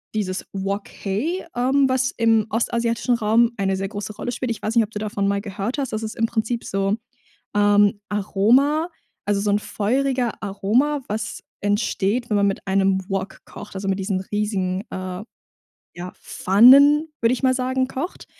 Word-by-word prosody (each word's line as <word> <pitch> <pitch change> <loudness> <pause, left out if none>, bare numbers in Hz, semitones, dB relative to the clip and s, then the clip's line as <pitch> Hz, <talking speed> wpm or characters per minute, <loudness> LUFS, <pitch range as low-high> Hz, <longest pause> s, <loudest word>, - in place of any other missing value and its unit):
dieses 190 -3 -2
Wok 195 +1 -3 0.2
hei, 305 - -1
ähm, 265 +3 +3
was 260 0 +1
im 225 -2 +3
ostasiatischen 235 +2 0
Raum 230 +1 +3
eine 195 -1 0
sehr 195 +1 -3
große 205 0 -6
Rolle 245 - -4
spielt. 250 +1 -3
Ich 230 - -5
weiß 215 - -1
nicht, 230 - +5
ob 210 - -6
du 210 - -6
davon 205 -2 -2
mal 200 0 0
gehört 200 +4 -4
hast, 270 -5 -3
das 215 - -2
ist 220 0 -5
im 225 - +1
Prinzip 230 +1 -2
so, 195 +2 0 0.6
ähm, 205 0 +4
Aroma, 240 - +2 0.4
also 205 -1 +1
so 205 0 +1
'n 205 - +2
feuriger 250 +4 -1
Aroma, 235 +9 +1
was 215 +1 -4 0.2
entsteht, 205 +2 0
wenn 205 - +3
man 200 0 +3
mit 195 - -3
einem 190 0 +2
Wok 195 0 -4
kocht, - - -11
also 195 +1 -4
mit 195 0 0
diesen 190 -1 -1
riesigen, 195 -2 -2
äh, 185 0 -5 0.7
ja, 180 +1 -7
Pfannen, 280 +10 +6
würde 230 +1 +3
ich 255 - -7
mal 260 - +4
sagen, 260 0 0
kocht. 285 +9 -5
215 Hz, 175 wpm, -22 LUFS, 195-245 Hz, 0.7 s, Pfannen